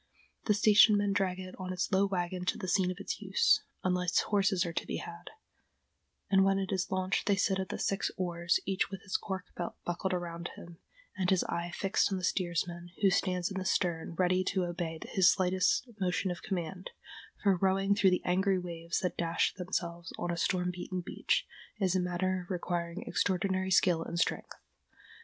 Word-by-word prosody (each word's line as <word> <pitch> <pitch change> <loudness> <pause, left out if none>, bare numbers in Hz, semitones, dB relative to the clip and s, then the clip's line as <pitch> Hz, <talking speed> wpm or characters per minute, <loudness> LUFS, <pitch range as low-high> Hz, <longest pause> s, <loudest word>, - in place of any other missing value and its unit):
The 210 - +3
station 210 0 +6
men 205 -1 +1
drag 190 -2 0
it 185 0 -7
on 185 0 -4
its 185 +2 -2
low 195 +1 +3
wagon 180 -1 -2
to - - 0
the 185 - -5
scene 185 0 +2
of 185 - -4
its - - -4
use, 465 -1 +3 0.2
unless 180 -1 +2
horses 195 -3 +1
are 170 - -4
to - - -3
be - - -2
had, 170 +1 -8 1.0
and 195 -1 +4
when 195 0 +3
it 195 -1 -2
is 190 -1 -1
launched 185 +1 -1
they 200 - +4
sit 190 0 +1
at 190 -2 -3
the - - -3
six 195 - 0
oars, 175 -1 0
each 190 0 0
with 195 -1 -8
his 190 - -5
cork 190 -2 -2
belt 175 - -4
buckled 175 +2 -2
around 170 -1 -4
him, 170 -1 -12 0.4
and 185 -2 0
his 190 -2 +3
eye 170 0 -3
fixed 195 +1 +1
on 190 - 0
the 185 - -6
steersman, 175 -1 -1
who 195 - +6
stands 180 0 0
in 190 - -3
the - - -3
stern, 170 -3 -1
ready 185 +1 +2
to 190 -1 0
obey 170 -2 -3
his 190 -1 +5
slightest 185 +6 +1
motion 185 0 0
of 175 - -6
command, 185 -1 -4 0.5
for 200 -2 +4
rowing 195 +2 +2
through 200 -1 +4
the 180 - 0
angry 190 +2 +2
waves 170 -1 -3
that 180 - -2
dash 170 0 +1
themselves 175 -1 -4
on 175 - -2
a - - -1
storm 180 +1 0
beaten 180 +1 -4
beach 175 - 0 0.3
is 190 -3 +1
a - - +3
matter 180 0 -1
requiring 175 -1 -3
extraordinary 190 +1 0
skill 180 -3 +4
and 170 +1 -5
strength. 170 - -1
185 Hz, 195 wpm, -31 LUFS, 175-190 Hz, 1.0 s, station